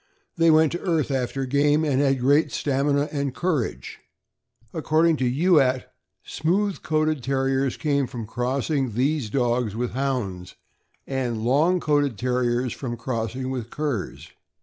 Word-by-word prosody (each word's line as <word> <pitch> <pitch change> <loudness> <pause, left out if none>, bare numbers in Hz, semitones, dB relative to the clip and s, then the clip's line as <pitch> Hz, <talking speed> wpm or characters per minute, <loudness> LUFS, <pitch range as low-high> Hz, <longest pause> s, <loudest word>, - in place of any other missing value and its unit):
They 165 0 +4
went 155 -1 +5
to 175 - -3
earth 160 -6 0
after 135 0 -1
game, 145 +3 +2
and 140 -2 +1
had 135 -2 +2
great 140 +5 +3
stamina 140 +1 0
and 140 -3 -2
courage. 160 -10 -2 0.7
According 160 0 +2
to 130 -2 +1
Youatt, 135 -3 +2 0.3
smooth 190 +6 -1
coated 155 -2 0
Terriers 135 0 0
came 140 -3 0
from 115 -2 -6
crossing 130 +2 -1
these 135 0 0
dogs 120 -3 0
with 120 +1 -2
Hounds, 120 -10 -3 0.5
and 125 -5 -2
long 155 +9 +3
coated 145 -7 +1
Terriers 125 +1 0
from 120 -3 -5
crossing 125 +2 -3
with 120 -3 -4
curs. 145 -9 -4
135 Hz, 135 wpm, -24 LUFS, 125-150 Hz, 0.7 s, went